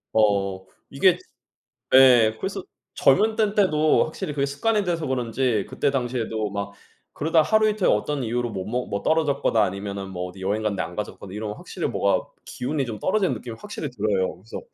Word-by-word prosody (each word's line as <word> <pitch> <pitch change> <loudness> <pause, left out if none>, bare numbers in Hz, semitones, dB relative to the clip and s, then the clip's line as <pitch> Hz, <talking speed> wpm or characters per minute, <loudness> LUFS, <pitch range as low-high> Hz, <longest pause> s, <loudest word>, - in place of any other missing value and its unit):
어 100 -3 +2 0.3
이게 - - +4 0.8
예 120 -4 +7
그래서 195 - -3 0.3
젊을 220 0 +3
때인데도 195 -8 +3
확실히 155 -1 -5
그게 140 -1 0
습관이 210 +10 0
돼서 165 -3 -1
그런지 125 -3 0
그때 145 - 0
당시에도 120 -5 -2
막 100 0 -4 0.4
그러다 160 +1 +2
하루 215 +6 +3
이틀 210 -2 +1
어떤 135 +6 +1
이유로 120 +1 -1
못 95 -3 -4
먹 125 +3 -2
뭐 100 0 -3
떨어졌거나 145 -8 +2
아니면은 100 0 -4
뭐 90 -1 -4
어디 95 +1 -13
여행 100 +3 -1
갔는데 100 -3 -1
안 85 +2 -7
가져갔거나 100 -2 -6
이러면 105 0 -4
확실히 - - -5
뭔가 - - +1 0.2
기운이 135 +1 -2
좀 110 -3 -5
떨어지는 195 - +1
느낌이 115 -2 -8
확실히 180 -8 -6
들어요. 100 -6 -1
그래서 100 +6 -9
120 Hz, 405 characters per minute, -24 LUFS, 100-155 Hz, 0.8 s, 예